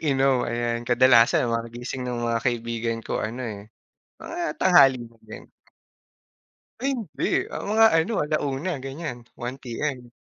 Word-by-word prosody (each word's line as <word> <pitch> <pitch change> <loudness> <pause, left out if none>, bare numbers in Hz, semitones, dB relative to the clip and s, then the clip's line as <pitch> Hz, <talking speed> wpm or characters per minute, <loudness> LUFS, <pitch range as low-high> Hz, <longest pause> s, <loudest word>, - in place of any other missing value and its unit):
nag-inom, 135 -4 +2
ayan. 120 0 -1
Kadalasan 120 -1 +5
mga 115 0 -2
gising 120 +2 -5
ng 120 -1 -3
mga 115 -1 0
kaibigan 115 -2 -1
ko - - -2
ano, 120 +4 -4
eh, 105 -2 -7 0.5
mga 340 0 -4
tanghali 140 -9 +6
na 115 0 -16
din. 110 - -11 1.3
Ay 275 +2 +1
hindi, 220 - -5 0.3
ah, - - -4
mga 225 +1 +6
ano 165 +8 +1
1:00 150 +2 -2
gan'yan. 135 -1 -5 0.2
1 120 +2 -4
PM. 125 0 -4
125 Hz, 140 wpm, -24 LUFS, 115-145 Hz, 1.3 s, tanghali